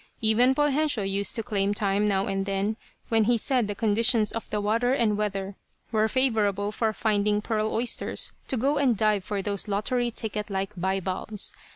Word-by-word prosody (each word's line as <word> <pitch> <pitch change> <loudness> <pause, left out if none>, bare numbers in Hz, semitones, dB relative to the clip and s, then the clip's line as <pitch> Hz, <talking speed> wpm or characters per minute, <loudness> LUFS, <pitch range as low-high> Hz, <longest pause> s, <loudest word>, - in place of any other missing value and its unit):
Even 235 +4 +4
Poljensio 295 -5 +1
used 195 +1 -1
to 225 - -2
claim 205 -3 0
time, 205 0 +1
now 195 -1 +1
and 195 0 -2
then, 200 +2 -1 0.3
when 225 -2 +3
he 240 +1 +3
said 245 -1 +1
the 205 - -3
conditions 225 +1 +2
of 230 - -6
the 210 - -1
water 230 +5 +1
and 225 -5 +2
weather 195 -2 -3 0.3
were 220 -1 +2
favorable 210 -5 +1
for 220 +1 0
finding 210 -1 +1
pearl 215 0 -1
oysters, 235 +2 0
to 260 - 0
go 280 +5 +1
and 255 -6 +2
dive 210 -2 +2
for 200 0 -3
those 200 0 -3
lottery 240 +4 0
ticket 215 -2 -4
like 195 +1 -3
bivalves. 190 +3 -2
215 Hz, 180 wpm, -26 LUFS, 200-230 Hz, 0.3 s, Even